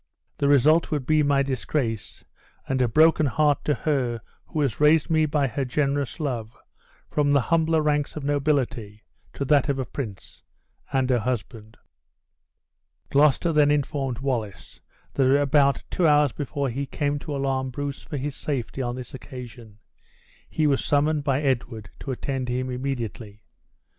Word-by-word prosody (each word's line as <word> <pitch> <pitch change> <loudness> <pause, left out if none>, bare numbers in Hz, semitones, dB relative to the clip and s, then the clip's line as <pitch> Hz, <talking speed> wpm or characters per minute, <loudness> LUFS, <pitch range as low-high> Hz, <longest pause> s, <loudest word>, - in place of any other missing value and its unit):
The 140 - +2
result 145 +4 +4
would 145 -4 -2
be 155 +2 +3
my 140 -1 +3
disgrace, 130 -4 -3 0.4
and 130 -1 0
a 125 - +3
broken 155 +4 +4
heart 150 +2 +2
to 150 - +2
her 125 -5 -1 0.3
who 155 - -2
has 135 -7 -1
raised 150 +2 +4
me 155 -1 +3
by 145 -1 +1
her 135 +2 -2
generous 140 +2 -1
love 120 -7 -4 0.5
from 145 -1 +2
the 140 - +5
humbler 160 -1 +3
ranks 150 -1 0
of 155 - -5
nobility 135 -7 -1 0.3
to 140 - -3
that 145 -1 +3
of 140 - +1
a 130 - -2
prince, 110 -9 -8 0.5
and 135 -2 +1
her 125 - +3
husband." 110 -2 -4 1.3
Gloucester 150 +4 +3
then 150 -1 +4
informed 140 -3 -1
Wallace 120 -7 -4 0.3
that 135 +1 +3
about 140 -1 +3
two 175 - +2
hours 150 -2 +4
before 140 0 -3
he 140 +3 -3
came 145 +1 -1
to 145 0 -5
alarm 135 -1 -1
Bruce 140 +2 -5
for 145 - -6
his 140 +1 -4
safety 135 -2 -3
on 120 -1 -2
this 125 -1 -8
occasion, 120 -4 -10 0.7
he 155 - 0
was 140 -2 +2
summoned 150 +1 +1
by 140 0 0
Edward 115 -5 -2
to - - -8
attend 130 0 -3
him 130 +1 -2
immediately. 115 -5 -5
140 Hz, 160 wpm, -25 LUFS, 125-150 Hz, 1.3 s, the